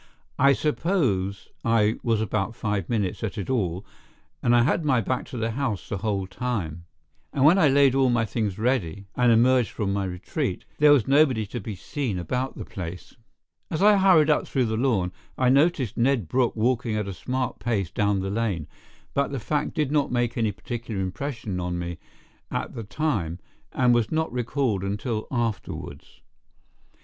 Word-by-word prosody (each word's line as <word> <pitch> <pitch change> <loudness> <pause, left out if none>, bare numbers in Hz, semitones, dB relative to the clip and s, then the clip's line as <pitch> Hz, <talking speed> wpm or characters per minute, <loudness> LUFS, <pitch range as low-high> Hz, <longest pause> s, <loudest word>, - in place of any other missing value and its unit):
I 140 +1 +6
suppose 125 - 0
I 115 -2 +2
was 115 -2 +1
about 110 0 -1
five 105 -5 -2
minutes 105 -5 -1
at 110 0 -3
it 100 +5 -3
all 95 -5 -1 0.6
and 120 0 +3
I 120 - +5
had 155 +5 +1
my 135 -5 +3
back 125 +3 -2
to 125 - -7
the 115 0 -1
house 120 -5 -2
the 100 - -3
whole 100 -2 -1
time, 95 -7 -4 0.5
and 135 - +2
when 175 +6 +6
I 160 - +6
laid 135 -1 +5
all 135 -1 +3
my 120 -2 +2
things 105 -3 -2
ready 105 -6 -1
and 125 -1 +4
emerged 120 +1 +4
from 100 -2 -2
my 100 -1 -1
retreat, 90 -1 -3
there 150 0 +7
was 135 -7 +4
nobody 135 -6 +4
to 110 +5 -5
be 110 -4 -6
seen 120 - -3
about 125 +9 -3
the - - -6
place. 90 -1 -7 0.6
As 160 +3 -1
I 210 0 +7
hurried 180 -6 +5
up 150 - +1
through 130 -3 +1
the 110 -1 -1
lawn, 110 -7 +1 0.3
I 130 -1 +3
noticed 140 - +2
Ned 120 - +2
Brooke 125 +5 +1
walking 115 0 0
at 105 -2 -2
a 100 - -4
smart 130 +8 -3
pace 105 -6 -1
down 100 -2 +1
the 95 +1 -3
lane, 100 -8 -1 0.5
but 140 0 0
the 135 - -2
fact 150 +8 -2
did 150 -4 0
not 150 -2 +1
make 120 -1 0
any 110 -3 +1
particular 115 0 -5
impression 100 0 -3
on 90 0 -2
me 85 -1 -5 0.5
at - - -3
the 115 - -5
time, 105 - -2 0.3
and 125 -1 +3
was 120 -3 +1
not 160 -2 -1
recalled 125 -4 -1
until 105 +3 -3
afterwards. 115 -6 -4
115 Hz, 180 wpm, -25 LUFS, 100-130 Hz, 0.6 s, there